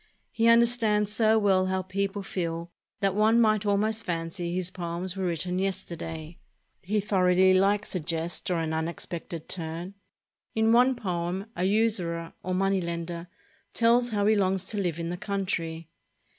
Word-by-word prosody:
He 230 0 +1
understands 230 -3 +4
so 220 0 +4
well 190 -3 +3
how 185 0 -1
peo 195 +2 -1
ple 200 0 -6
feel 170 -2 -4 0.3
that 195 -1 +2
one 215 +3 +4
might 215 -2 +3
almost 215 +2 +1
fancy 170 0 -3
his 185 0 0
poems 175 0 -4
were 190 -1 -2
writ 170 -3 -1
ten 180 0 -2
yesterday. 170 -4 -4 0.4
He 210 +3 0
thoroughly 185 -2 +3
likes 200 +2 +2
a 185 - -1
jest 165 +1 -2
or 180 - +1
an 160 -1 -2
unex 160 +1 -1
pected 170 -1 -7
turn. 170 +2 -2 0.6
In 220 0 +3
one 250 +2 +5
poem, 180 -2 -3
a 180 - -1
usurer, 190 -6 0
or 185 +1 -2
money 195 0 +1
lender, 170 0 -5 0.5
tells 240 +1 +4
how 205 -3 0
he 215 - +5
longs 190 -2 +1
to 215 - -4
live 175 -4 -2
in 170 0 -3
the 180 - -4
country. 170 -5 -3
185 Hz, 170 wpm, -27 LUFS, 170-210 Hz, 0.6 s, one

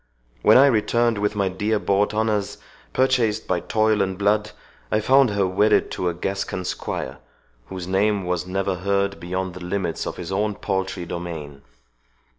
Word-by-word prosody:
—When - - +6
I 135 - +8
returned 115 -2 +2
with 105 +1 0
my 100 -2 +1
dear 105 +4 0
bought 100 0 +1
honours, 105 -2 -1 0.3
purchased 120 -5 +1
by 90 -1 +1
toil 110 +3 +1
and 95 -1 -1
blood, 105 +1 +1 0.4
I 110 - +3
found 135 +3 +4
her 100 -1 +1
wedded 105 +4 +2
to 90 - -1
a - - -3
Gascon 95 0 -3
squire, - - -4 0.5
whose 95 -2 -6
name 100 +1 +1
was 90 0 -2
never 95 0 -1
heard 100 +1 0
beyond 95 +1 -3
the 90 0 -9
limits 90 -2 -2
of - - -5
his 90 0 -6
own 105 +2 0
paltry 95 -3 -3
domain! 80 -5 -6
100 Hz, 165 wpm, -23 LUFS, 90-105 Hz, 0.5 s, I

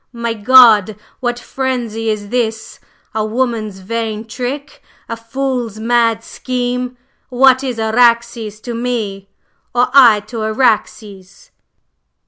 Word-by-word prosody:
"My 235 -1 -3
God! 220 -2 +6 0.2
What 240 -2 -2
frenzy 240 -4 -3
is 205 -1 -3
this! 225 -2 -3 0.3
A 220 - -1
woman's 215 -3 -2
vain 220 +2 -4
trick! 255 +5 -6 0.3
a 230 - -4
fool's 235 -1 -4
mad 230 -1 +1
scheme! 250 0 -3 0.3
What 260 +1 +4
is 255 -3 -3
Araxes 230 -1 +1
to 240 - -6
me? 220 -5 -3 0.5
or 245 +1 +3
I 235 -7 +7
to 220 +2 -7
Araxes?" 215 -4 -2
230 Hz, 110 wpm, -16 LUFS, 215-250 Hz, 0.5 s, I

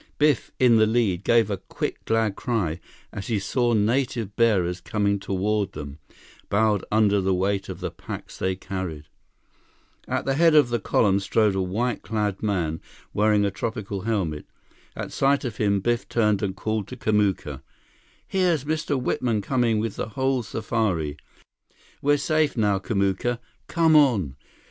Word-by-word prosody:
Biff, 150 -3 +2
in 120 -3 +5
the 110 0 +5
lead, 110 -5 +1
gave 115 -2 +3
a 100 - -1
quick - - -5
glad 110 -3 +1
cry 95 -10 -1 0.3
as 100 - -6
he 115 - 0
saw 120 +5 0
native 115 -1 0
bearers 95 -6 +2
coming 100 0 0
toward 100 +1 -1
them, 70 0 -8 0.5
bowed 105 -1 +2
under 105 -2 +3
the 95 0 +1
weight 95 +1 -1
of - - -7
the - - -3
packs - - -8
they 95 0 0
carried. 95 -5 -5 1.0
At - - -2
the 135 - +1
head 165 +2 +4
of 145 -5 +6
the 120 0 0
column 100 -1 +2
strode 105 +1 +2
a 95 - 0
white 110 +6 -1
clad 105 -3 -2
man 85 -7 -1 0.3
wearing 105 -1 +3
a 100 - 0
tropical 100 -1 -4
helmet. 95 -9 -2 0.5
At - - -5
sight 140 0 +2
of 115 -4 -4
him, 100 -2 +1
Biff 120 +2 -1
turned 105 -4 +2
and 95 -2 -2
called 110 0 -2
to 130 - -8
Kamuka: 105 -4 0 0.7
"Here's 180 -7 +1
Mr. 155 -2 -1
Whitman 120 -4 0
coming 120 -2 +1
with 110 +1 -2
the - - -3
whole 130 +3 0
safari! 105 -9 -1 0.9
We're 145 +1 +3
safe 155 -1 +1
now, 105 -3 +2
Kamuka! 100 +4 0 0.3
Come 165 -2 +3
on!" 110 - +4
105 Hz, 160 wpm, -24 LUFS, 95-120 Hz, 1.0 s, of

